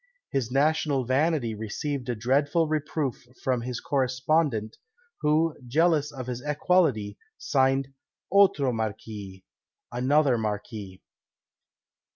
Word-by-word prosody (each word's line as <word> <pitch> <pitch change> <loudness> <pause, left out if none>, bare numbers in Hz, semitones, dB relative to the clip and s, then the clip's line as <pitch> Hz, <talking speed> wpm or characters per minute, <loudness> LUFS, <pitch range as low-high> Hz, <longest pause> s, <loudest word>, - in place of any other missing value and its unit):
His 125 -4 -1
national 145 0 +1
vanity 135 -2 +1
received 125 +5 -4
a 120 - 0
dreadful 140 +8 +2
reproof 150 -3 -2 0.2
from 125 -2 +1
his 125 0 -4
correspondent, 130 -3 0 0.4
who, 155 +2 +2
jealous 150 +2 +2
of 130 -3 -7
his 125 -1 -4
equality, 145 - +1 0.2
signed 135 0 +1 0.4
OTRO 195 -9 +4
Marqies 105 -3 -5 0.5
(ANOTHER 130 +1 +2
Marquis). 105 -3 -5
130 Hz, 100 wpm, -27 LUFS, 115-150 Hz, 0.5 s, OTRO